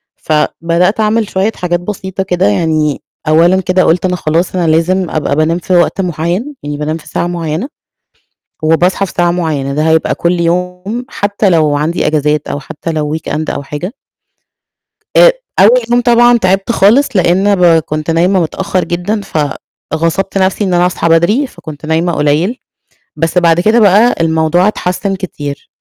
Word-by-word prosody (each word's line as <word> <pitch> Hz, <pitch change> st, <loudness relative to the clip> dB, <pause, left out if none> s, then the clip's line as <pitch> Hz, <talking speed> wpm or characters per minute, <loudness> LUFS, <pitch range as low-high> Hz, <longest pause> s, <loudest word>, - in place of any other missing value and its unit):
فبدأت 170 Hz, +5 st, 0 dB
أعمل 220 Hz, 0 st, +1 dB
شوية 195 Hz, +3 st, 0 dB
حاجات 175 Hz, -1 st, -1 dB
بسيطة 190 Hz, 0 st, -5 dB
كده 180 Hz, -2 st, 0 dB
يعني، 150 Hz, +6 st, 0 dB, 0.3 s
أولًا 170 Hz, +4 st, +4 dB
كده 185 Hz, 0 st, +1 dB
قُلت 175 Hz, +3 st, +1 dB
أنا 180 Hz, -1 st, 0 dB
خلاص 170 Hz, +2 st, -1 dB
أنا 175 Hz, -2 st, 0 dB
لازم 175 Hz, +3 st, +1 dB
أبقى 150 Hz, -2 st, -1 dB
بانام 155 Hz, +2 st, +1 dB
في 185 Hz, -, -3 dB
وقت 175 Hz, +2 st, +2 dB
معيّن 180 Hz, -, -3 dB
يعني 145 Hz, 0 st, -4 dB
بانام 150 Hz, +2 st, -3 dB
في 160 Hz, -, -16 dB
ساعة 175 Hz, -, -2 dB
معيّنة 170 Hz, -, -3 dB, 1.0 s
وباصحى 175 Hz, +5 st, +2 dB
في -, -, -9 dB
ساعة 175 Hz, 0 st, +2 dB
معيّنة، 155 Hz, -6 st, -2 dB
ده 155 Hz, +3 st, 0 dB
هيبقى 160 Hz, 0 st, +1 dB
كُلّ 175 Hz, +1 st, 0 dB
يوم 180 Hz, +7 st, -2 dB
حتى 205 Hz, 0 st, -1 dB
لو 155 Hz, -4 st, +2 dB
عَندي 155 Hz, +4 st, -1 dB
إجازات 150 Hz, -1 st, 0 dB
أو 145 Hz, -, -4 dB
حتى 160 Hz, +3 st, -6 dB
لو 155 Hz, -1 st, -2 dB
weekend 155 Hz, 0 st, -4 dB
أو 140 Hz, -, -4 dB
حاجة. 150 Hz, -, -6 dB, 1.2 s
أ -, -, +7 dB, 0.3 s
أول -, -, +6 dB
يوم 240 Hz, 0 st, +3 dB
طبعًا 240 Hz, 0 st, +4 dB
تعبت 195 Hz, +2 st, 0 dB
خالص 230 Hz, +7 st, +4 dB
لأن 190 Hz, +3 st, +2 dB
ب 180 Hz, -, +2 dB, 0.2 s
كنت 155 Hz, +1 st, -4 dB
نايمة 180 Hz, +4 st, +2 dB
متأخر 185 Hz, +3 st, -2 dB
جدًا، 180 Hz, +5 st, -2 dB, 0.7 s
فغصبت 165 Hz, +5 st, -1 dB
نَفْسي 190 Hz, +2 st, 0 dB
إن 185 Hz, -2 st, 0 dB
أنا 175 Hz, 0 st, +3 dB
أصحى 180 Hz, -2 st, -1 dB
بدري 170 Hz, -, +2 dB
فكنت 155 Hz, -, -11 dB
نايمة 165 Hz, +2 st, 0 dB
قليل 155 Hz, -, 0 dB, 0.6 s
بس 165 Hz, +2 st, -1 dB
بعد 170 Hz, -1 st, +3 dB
كده 215 Hz, +6 st, +3 dB
بقى 215 Hz, +3 st, +4 dB
الموضوع 160 Hz, +3 st, +2 dB
اتحسن 195 Hz, -1 st, -2 dB
كتير. 145 Hz, -7 st, -6 dB
175 Hz, 165 wpm, -13 LUFS, 160-190 Hz, 1.2 s, أ